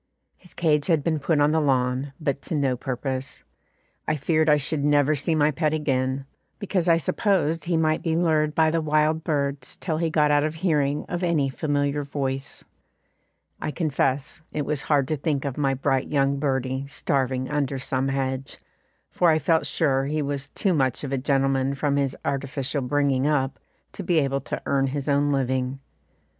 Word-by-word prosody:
His 180 - -16
cage 150 -3 +2
had 160 -5 +2
been 160 -1 0
put 145 +2 +1
on 145 +1 +4
the 160 0 +2
lawn, 130 -1 0
but 140 -3 -2
to - - -1
no 135 -3 +1
purpose. 130 +1 -4 0.6
I - - +1
feared 155 +2 +1
I 150 - +6
should 145 +1 -1
never 145 0 +3
see 155 +3 0
my 150 0 +3
pet 155 +1 0
again, 135 -2 -1 0.3
because 185 -4 -1
I 165 - +6
supposed 165 -1 0
he 170 -1 +1
might 155 -1 +1
be 165 -2 0
lured 155 -3 +1
by 160 -1 +4
the 165 0 +1
wild 155 +1 +1
birds 140 -4 -2
till 160 -4 -2
he 165 -1 +1
got 150 -2 +3
out 145 0 +3
of 155 +1 -2
hearing 150 -4 0
of 175 0 -3
any 165 -6 +1
familiar 145 +1 -1
voice. 135 -1 -4 1.0
I - - -2
confess 145 -2 -1
it 150 -2 -2
was 150 -1 -1
hard 140 -3 +1
to 155 - 0
think 145 -1 -1
of 135 -3 -3
my 135 -2 +1
bright 135 0 0
young 140 -1 +1
birdie 130 -1 -1
starving 130 -2 -1
under 140 -2 -1
some 130 0 -1
hedge, 135 0 -2 0.5
for 175 - +3
I 155 - +4
felt 160 +2 +1
sure 135 -4 +1
he 150 +1 -1
was 140 -1 -3
too 195 +4 0
much 130 -4 0
of 140 - -4
a - - +1
gentleman 135 0 +1
from 140 0 0
his 140 -2 0
artificial 140 0 -2
bringing 135 +1 +1
up 140 -3 0 0.3
to - - -7
be 175 -2 +1
able 140 -2 +1
to - - -5
earn 135 -1 +1
his 140 +1 -3
own 145 0 +2
living. 130 -1 -1
145 Hz, 185 wpm, -24 LUFS, 135-155 Hz, 1.0 s, I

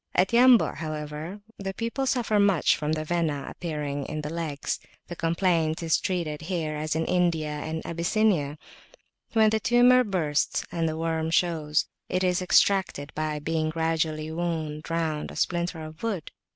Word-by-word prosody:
At 190 +6 +3
Yambu', 245 0 +6
however, 155 +4 -5 0.2
the 195 -1 -4
people 235 +4 -2
suffer 230 -5 +1
much 200 -5 +4
from 150 0 -2
the 155 0 -2
Vena 155 -4 -1
appearing 145 -4 -4
in 155 0 -4
the 150 +1 -5
legs. 160 -4 -3 0.3
The 175 - -5
complaint 165 -1 +1
is 165 -1 +2
treated 165 -5 -2
here 160 -3 -2
as 155 +1 -2
in 160 - 0
India 170 -4 +1
and 160 +2 -4
in - - -9
Abyssinia: 170 -3 +1 0.8
when 220 -1 +5
the 220 - +2
tumour 245 +2 +5
bursts, 160 -9 0
and 165 -1 0
the 155 - -4
worm 160 0 -1
shows, 160 -3 +1 0.2
it 185 +1 0
is 180 0 +2
extracted 180 -4 +2
by 155 -1 -2
being 155 +1 -1
gradually 160 -1 -1
wound 160 -2 -3
round 160 -2 -1
a - - -10
splinter 170 -2 -1
of 155 +1 -10
wood. 210 -8 -3
165 Hz, 165 wpm, -26 LUFS, 155-185 Hz, 0.8 s, Yambu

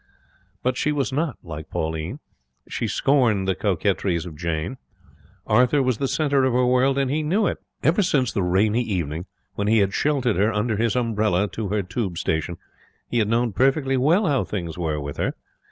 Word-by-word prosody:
But 125 0 0
she 150 - +1
was 140 -2 -1
not 150 -3 -1
like 80 -2 -8
Pauline. 80 - -3 0.5
She - - -2
scorned 115 -9 +2
the 95 - +2
coquetries 95 -3 0
of 85 -3 -8
Jane. 85 - -3 0.7
Arthur 125 +3 +3
was 130 -4 0
the 135 - 0
centre 140 -2 +1
of 130 -2 +2
her 125 +1 +3
world, 130 +2 +3
and 135 -1 +1
he 155 +2 0
knew 190 +8 +1
it. - - -1 0.2
Ever 170 +6 +3
since 140 - +1
the 100 - -1
rainy 100 +6 +2
evening 85 -6 -3 0.3
when 100 - -2
he 110 +1 +4
had 100 -2 +2
sheltered 135 - +1
her 105 +3 +3
under 105 0 0
his 115 +1 +1
umbrella 110 -5 +1
to 105 +3 -4
her 105 +1 0
Tube 95 -1 -3
station, 80 +2 -1 0.5
he 120 - +2
had 110 - +2
known 115 0 +1
perfectly 135 - +2
well 160 +11 +3
how 140 -6 +2
things 85 -6 -4
were 80 -4 -2
with 70 0 -6
her. - - -1
110 Hz, 190 wpm, -23 LUFS, 90-135 Hz, 0.7 s, he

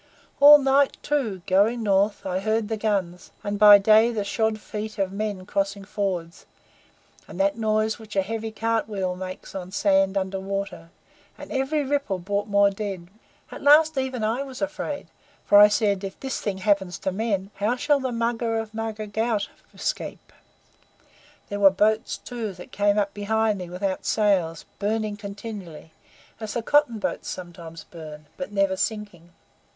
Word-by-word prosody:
All 290 +1 +10
night, 275 0 +2
too, 230 -12 -1
going 215 +5 +2
North, 200 0 +1
I 185 -1 -1
heard 215 +1 -1
the 220 - 0
guns, 195 -5 -2
and 205 0 -3
by 210 -1 +10
day 220 +3 +5
the 215 -3 -2
shod 220 +2 0
feet 215 +1 -6
of 195 -2 -1
men 200 -2 -4
crossing 200 0 -2
fords, 185 -5 -4 0.8
and 175 - -10
that 200 +1 +2
noise 220 0 0
which 220 -2 -11
a 195 - +3
heavy 225 +2 -4
cart 225 0 -1
wheel 190 -3 -2
makes 185 0 -8
on 185 -2 -6
sand 195 -1 +2
under 190 0 -2
water; 195 -3 -5 0.5
and - - -10
every 280 +3 0
ripple 280 -8 -1
brought 200 +3 -2
more 200 -1 +4
dead. 195 -4 -5 0.4
At - - -8
last 310 +2 +6
even 260 -3 -2
I 225 +5 0
was 265 -2 -7
afraid, 295 0 -4 0.4
for 205 - +7
I 210 - +10
said: 205 -2 +1
'If 195 0 -6
this 265 0 -4
thing 200 -3 -2
happen 195 -1 +1
to 185 +1 -3
men, 200 -1 -2
how 210 +5 +1
shall 290 +3 +2
the 260 -1 -2
Mugger 230 -1 -1
of 225 -1 -5
Mugger 220 -1 -4
Ghaut 215 0 -1 0.2
escape?' - - -5 1.2
There 205 - -3
were 200 -1 +8
boats, 215 +3 +1
too, 230 -5 -5
that 180 0 -12
came 205 0 +2
up 200 -1 0
behind 215 0 0
me 180 -1 -7
without 185 +1 -3
sails, 185 -7 +1
burning 215 +1 -1
continually, 200 -6 -8 0.5
as 220 -2 -6
the 235 - -1
cotton 290 -3 +3
boats 210 - -3
sometimes 170 -2 -8
burn, 155 -3 -11
but 275 - -6
never 195 -2 +1
sinking." 195 -4 -4
205 Hz, 165 wpm, -24 LUFS, 195-225 Hz, 1.2 s, All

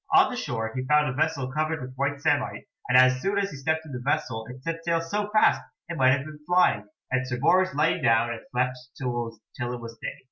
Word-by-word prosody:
On - - +6
the - - -4
shore 115 - -3
he 130 - -2
found 150 +2 +4
a 130 - -2
vessel 145 -3 -1
covered 155 +2 -1
with 130 -1 -7
white 140 +2 -2
samite, 145 -10 0 0.2
and 125 - +6
as 130 0 +5
soon 200 +1 0
as 200 0 0
he - - -8
stepped 160 +3 -1
in 155 - -10
the 125 - -4
vessel 125 -4 -1
it 130 +1 -10
set 165 +1 -4
sail 170 -1 +1
so 205 +5 -2
fast 215 0 +4 0.3
it 170 - -3
might 130 -2 +5
have 140 +1 -1
been 155 -1 -10
flying, 175 - +3 0.2
and 130 0 0
Sir 125 -1 -2
Bors 185 +5 +3
lay 150 +3 +2
down 115 +1 +3
and 115 - -5
slept 125 0 -1 0.2
till 120 -2 -2 0.3
it 120 0 -3
was 115 -1 -9
day. - - -5
135 Hz, 240 wpm, -26 LUFS, 125-160 Hz, 0.3 s, On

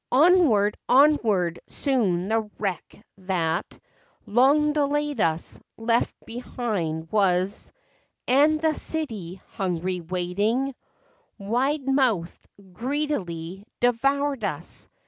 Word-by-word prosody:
Onward, 265 - +4
onward, 225 - +3
soon 200 -10 0
the 220 -1 0
wreck 200 +1 -5
that 175 -3 -2 0.5
Long 285 +7 +3
delayed 295 -3 0
us, 160 0 -1 0.2
left 230 +1 +1
behind 205 -9 -4
was— 195 -1 +1 0.6
And 295 +5 +4
the 315 0 +2
city, 215 - -2
hungry, 180 -2 -2
waiting, 200 +10 -1 0.6
Wide 260 +8 -1
mouthed, 250 -11 0 0.3
greedily 200 - -3 0.2
devoured 275 +2 +1
us. 170 -4 -4
225 Hz, 90 wpm, -25 LUFS, 180-275 Hz, 0.6 s, Onward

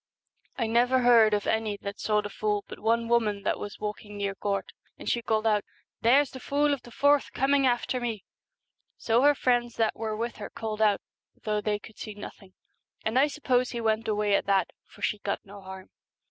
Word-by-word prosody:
I 235 - 0
never 245 +3 +3
heard 235 -3 +6
of 205 - -2
any 220 -2 0
that 200 0 -5
saw 210 -1 +1
the 205 - -6
fool 210 0 -1
but - - -9
one 230 +2 +1
woman 215 -4 +1
that - - 0
was 205 - -6
walking 210 0 -6
near 200 -1 -1
Gort, 200 0 -3 0.3
and - - -10
she 235 - +1
called 220 -2 0
out, 210 -2 +3 0.2
" - - -60
There's 265 +4 +4
the 260 - -8
fool 290 +2 +1
of 280 - -3
the 240 - -13
forth 285 +4 +2
coming 275 0 +3
after 250 +1 0
me." 225 -4 -3 0.7
So 230 +1 +2
her 290 +1 +5
friends 245 -3 +1
that 225 -1 +1
were 220 -1 -3
with 235 +1 -3
her 210 - -6
called 220 -1 -5
out, 210 -2 +3 0.4
though 210 -1 0
they 210 0 0
could 215 +1 -15
see 215 -2 -7
nothing, 200 -2 -11 0.5
and 220 +4 +2
I 285 - +5
suppose 255 -4 0
he 240 - -4
went 220 0 0
away 210 -1 +1
at 200 - +2
that, 195 -3 +2 0.2
for - - -15
she 210 - 0
got 200 - -3
no 200 0 -11
harm. 190 0 -10
220 Hz, 215 wpm, -27 LUFS, 210-245 Hz, 0.7 s, heard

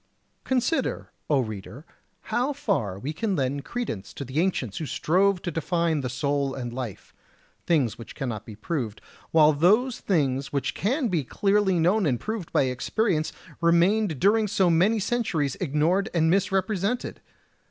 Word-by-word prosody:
Consider, 260 +5 -1 0.2
O 145 -3 +3
reader, 110 +5 -7 0.5
how 260 +4 +1
far 170 - -1
we 135 +10 -4
can 205 +4 -1
lend 140 -1 -1
credence 175 - -5
to 140 - -5
the 130 +4 -2
ancients 160 - -1
who 155 - -4
strove 185 +5 +1
to 175 - -2
define 165 -1 0
the 125 - -3
soul 140 +1 -1
and 120 -2 -5
life, 120 -6 -6 0.5
things 130 -10 +1
which 115 - -10
cannot 120 -8 -4
be 110 -2 -10
proved; 115 -1 -3 0.3
while 155 -1 +5
those 215 - +3
things 135 -7 0
which 140 -2 -1
can 255 - 0
be 170 -6 0
clearly 195 - +1
known 180 +3 +3
and 125 -4 0
proved 215 -6 -5
by - - +3
experience 155 - 0 0.3
remained 170 0 +3
during 210 +3 +3
so 185 -3 +2
many 190 +7 +3
centuries 190 - 0
ignored 175 +6 +1
and 160 -1 +3
misrepresented! 195 +4 0
165 Hz, 155 wpm, -26 LUFS, 135-200 Hz, 0.5 s, while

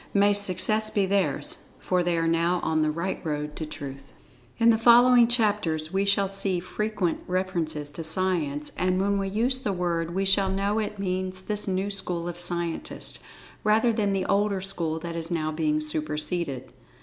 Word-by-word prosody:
May 200 +1 +5
success 205 +2 +1
be 200 -2 +1
theirs, 195 0 0 0.2
for 180 -1 0
they 175 -1 0
are 165 - +1
now 170 +2 +2
on 160 0 +1
the 155 - +2
right 170 +5 -3
road 150 -2 -3
to 155 - -4
Truth. 140 -2 -8 0.4
In 230 0 +5
the 220 - +3
following 240 +1 +7
chapters 205 -9 +1
we 195 +1 +1
shall 200 0 +2
see 195 -1 -1
frequent 190 0 -2
references 170 -5 -2
to 165 +3 -6
"Science"—and 170 +1 -1
when 200 +1 +1
we 195 - -1
use 240 +6 +1
the 255 -6 -2
word 170 -2 -2
we 195 +1 0
shall 195 0 +3
know 200 +3 0
it 210 -1 -3
means 185 -1 -3
this 210 +1 -3
new 190 +1 -1
school 175 -3 -2
of 175 0 -5
Scientists, 175 -1 -2 0.4
rather 220 +2 +3
than 210 -3 0
the 190 -1 0
older 200 0 +1
school 175 -4 -3
that 170 0 -5
is 165 0 -4
now 155 -3 -1
being 155 -1 0
superceded. 150 -2 -2
185 Hz, 175 wpm, -26 LUFS, 165-200 Hz, 0.4 s, following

